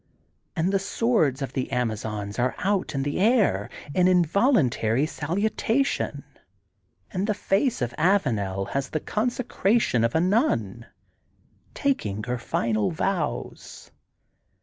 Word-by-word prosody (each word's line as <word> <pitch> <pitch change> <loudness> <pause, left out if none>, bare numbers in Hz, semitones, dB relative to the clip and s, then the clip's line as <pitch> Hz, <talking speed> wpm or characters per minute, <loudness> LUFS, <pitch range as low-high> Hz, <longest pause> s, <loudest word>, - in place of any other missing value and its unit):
And 175 +2 +1
the 195 - +3
swords 190 - +1
of 135 - -5
the 130 - -3
Amazons 110 -3 -3
are 125 +1 +1
out 190 -4 -1
in 135 - 0
the 145 +4 -2
air 220 +1 +3 0.2
in 180 +2 +4
involuntary 170 - +3
salutation, 210 - -1 0.9
and 190 +2 -1
the 210 - +1
face 205 - 0
of 120 0 -3
Avanel 110 - +1
has 135 -1 -2
the 155 - -2
consecration 215 - 0
of 115 - 0
a - - +4
nun, 210 - 0 0.9
tak 280 -2 0
ing 105 +1 -4
her 125 +1 -3
final 110 -2 0
vows. 180 +2 -3
165 Hz, 125 wpm, -25 LUFS, 120-205 Hz, 0.9 s, in